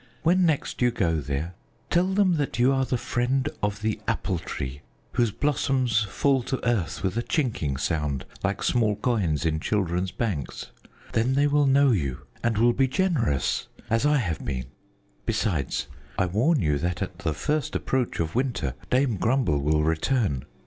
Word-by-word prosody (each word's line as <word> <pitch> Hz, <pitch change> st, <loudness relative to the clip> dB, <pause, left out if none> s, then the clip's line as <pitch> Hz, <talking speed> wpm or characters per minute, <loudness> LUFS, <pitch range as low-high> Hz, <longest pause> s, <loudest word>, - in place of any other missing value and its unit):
When 175 Hz, +2 st, +4 dB
next 150 Hz, -4 st, -1 dB
you 125 Hz, -, +5 dB
go 90 Hz, -9 st, 0 dB
there, 75 Hz, +5 st, -3 dB, 0.4 s
tell 175 Hz, +1 st, +3 dB
them 190 Hz, -3 st, +3 dB
that 145 Hz, -4 st, -2 dB
you 125 Hz, +3 st, +4 dB
are 135 Hz, 0 st, +1 dB
the 125 Hz, 0 st, 0 dB
friend 130 Hz, +3 st, 0 dB
of 105 Hz, 0 st, -2 dB
the 110 Hz, -1 st, 0 dB
Apple -, -, 0 dB
Tree 65 Hz, +2 st, -5 dB, 0.3 s
whose 120 Hz, -2 st, +2 dB
blossoms 130 Hz, -1 st, +1 dB
fall 135 Hz, +5 st, +2 dB
to 130 Hz, +2 st, -3 dB
earth 105 Hz, -9 st, 0 dB
with 95 Hz, +2 st, -1 dB
a -, -, +2 dB
chinking 110 Hz, -, -1 dB
sound, 75 Hz, -2 st, -1 dB, 0.2 s
like -, -, -1 dB
small 110 Hz, -4 st, +2 dB
coins 100 Hz, -, 0 dB
in 80 Hz, -1 st, +1 dB
children's 90 Hz, -1 st, 0 dB
banks. 90 Hz, -, -3 dB, 0.4 s
Then 120 Hz, +4 st, +2 dB
they 140 Hz, +1 st, +4 dB
will 145 Hz, 0 st, +3 dB
know 140 Hz, 0 st, +5 dB
you 70 Hz, -, -1 dB, 0.2 s
and 115 Hz, -2 st, +1 dB
will 120 Hz, +2 st, +4 dB
be 135 Hz, +1 st, +2 dB
generous 130 Hz, -, 0 dB, 0.2 s
as 115 Hz, +2 st, +2 dB
I 150 Hz, 0 st, +4 dB
have 90 Hz, -, -2 dB
been. 65 Hz, -4 st, -3 dB, 0.6 s
Besides, 100 Hz, -, 0 dB, 0.3 s
I 95 Hz, -, +3 dB
warn 115 Hz, -, +2 dB
you 75 Hz, -2 st, +1 dB
that 90 Hz, +4 st, -1 dB
at 95 Hz, -1 st, -7 dB
the 80 Hz, -6 st, -1 dB
first 150 Hz, -, -1 dB
approach 130 Hz, -3 st, -1 dB
of 80 Hz, -1 st, -1 dB
winter, 120 Hz, -, -1 dB, 0.2 s
Dame 125 Hz, -4 st, +2 dB
Grumble 110 Hz, -, +1 dB
will 75 Hz, +2 st, +2 dB
return. 80 Hz, -, 0 dB
115 Hz, 170 wpm, -26 LUFS, 80-135 Hz, 0.6 s, you